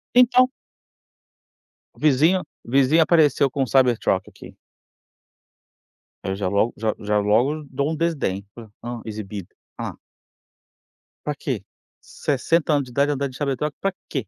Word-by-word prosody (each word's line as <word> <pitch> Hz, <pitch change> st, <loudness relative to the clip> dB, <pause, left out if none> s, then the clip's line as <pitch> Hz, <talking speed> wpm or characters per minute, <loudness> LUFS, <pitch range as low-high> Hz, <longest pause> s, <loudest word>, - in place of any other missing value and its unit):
Então 250 Hz, 0 st, +6 dB, 1.5 s
o -, -, -20 dB
vizinho 155 Hz, +5 st, +4 dB, 0.2 s
o -, -, -10 dB
vizinho 140 Hz, +5 st, +5 dB
apareceu 150 Hz, -4 st, +4 dB
com 140 Hz, -, -2 dB
um 130 Hz, -, -3 dB
Cybertruck 125 Hz, -3 st, +2 dB
aqui. -, -, -13 dB, 1.7 s
Aí 95 Hz, -, -2 dB
eu -, -, -2 dB
já 100 Hz, -, -1 dB
logo 100 Hz, +5 st, +1 dB
já 110 Hz, 0 st, -1 dB
já 105 Hz, 0 st, +1 dB
logo 125 Hz, +9 st, +1 dB
dou 140 Hz, +3 st, -1 dB
um 160 Hz, -, -2 dB
desdém, 145 Hz, -, -1 dB
falo: 115 Hz, -3 st, -11 dB
"Hã, 120 Hz, -1 st, -5 dB
exibido. 105 Hz, -3 st, -6 dB, 0.3 s
Alá" -, -, -4 dB, 1.3 s
pra -, -, -1 dB
quê? -, -, -3 dB, 0.4 s
60 155 Hz, +3 st, 0 dB
anos 145 Hz, -1 st, +2 dB
de -, -, -12 dB
idade 140 Hz, +4 st, +2 dB
andando 140 Hz, -1 st, -2 dB
de 125 Hz, -, -11 dB
Cybertruck 145 Hz, +1 st, -2 dB
pra 195 Hz, -1 st, -1 dB, 0.2 s
quê? 130 Hz, -, -3 dB
135 Hz, 145 wpm, -23 LUFS, 110-150 Hz, 1.7 s, Então